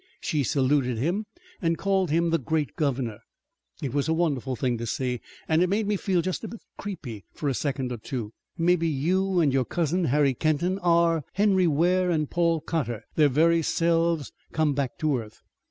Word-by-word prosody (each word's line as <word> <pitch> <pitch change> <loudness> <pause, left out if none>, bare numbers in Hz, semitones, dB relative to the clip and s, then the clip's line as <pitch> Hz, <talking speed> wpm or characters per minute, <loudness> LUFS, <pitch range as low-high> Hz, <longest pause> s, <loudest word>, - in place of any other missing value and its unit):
She 150 - -1
saluted 130 -2 +1
him 180 - -1 0.3
and 165 -2 +1
called 195 -3 +1
him 165 +2 +2
the 165 - +2
great 150 +2 -1
governor. 130 -8 -1 0.6
It 130 -3 -3
was 145 +2 0
a - - +3
wonderful 140 -6 0
thing 120 -1 -1
to 115 - -4
see, 125 +1 -2 0.3
and 160 +1 +3
it 180 - +3
made 210 +3 +1
me 205 +1 +1
feel 185 -3 0
just 185 +4 -3
a - - -3
little 230 - -8
bit - - -25 0.2
creepy 130 - -6
for 150 - -4
a 135 - +1
second 135 -1 -2
or 120 - -3
two. 115 -1 -5 0.2
Mebbe 175 0 +3
you 175 +5 +1
an' 150 -5 +3
your 130 -1 +2
cousin, 170 +5 0
Harry 140 -1 +3
Kenton, 155 +8 0
are 170 -3 +3
Henry 195 -2 +3
Ware 180 +4 +2
an' 155 -3 +1
Paul 170 0 +1
Cotter, 135 -11 -2
their 150 -2 +4
very 165 +5 +3
selves 165 -1 +1 0.2
come 155 -2 +1
back 135 -3 -2
to 150 -5 +1
earth. 110 -1 -11
160 Hz, 195 wpm, -26 LUFS, 135-175 Hz, 0.6 s, their